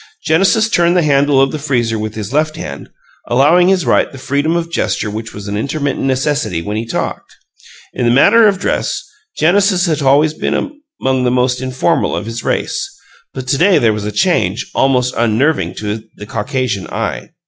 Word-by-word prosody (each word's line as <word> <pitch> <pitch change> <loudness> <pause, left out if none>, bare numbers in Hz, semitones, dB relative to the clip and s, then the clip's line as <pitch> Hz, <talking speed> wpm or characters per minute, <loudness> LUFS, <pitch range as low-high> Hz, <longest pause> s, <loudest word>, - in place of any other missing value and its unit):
Genesis 195 +7 +3
turned 175 -4 +2
the 175 - +3
handle 140 -1 +3
of 135 0 +3
the 155 - -4
freezer 120 -6 -1
with 110 0 -5
his 110 +2 -6
left 155 +1 +1
hand, 70 - -7 0.4
allowing 150 +9 +4
his 190 -3 +2
right - - +2
the 135 - -11
freedom 145 +5 -1
of 170 -1 -2
gesture 110 -9 -1
which 110 +1 -6
was 105 0 -9
an 100 - -3
intermittent 140 +5 -2
necessity 135 - 0
when 105 +5 -4
he 115 +1 -3
talked. - - -4 0.6
In 120 - -1
the - - +4
matter 210 - +5
of 200 -2 +2
dress, 200 - -2 0.3
Genesis 185 +2 +3
had 155 -3 -1
always 145 +3 +3
been - - -2 0.4
among 130 -1 0
the 125 - +2
most 125 0 +1
informal 130 0 0
of - - -4
his 115 +1 -6
race, - - -2 0.4
but 130 -1 -7
to 140 - +1
day 185 +2 +5
there 115 -2 +3
was 105 -1 -4
a 105 - -3
change 105 - 0
almost 125 -2 +1
unnerving 120 +7 +1
to 105 +1 -4
the 105 - -9
Caucasian 110 -1 -3
eye. - - -4
135 Hz, 190 wpm, -15 LUFS, 115-155 Hz, 0.6 s, matter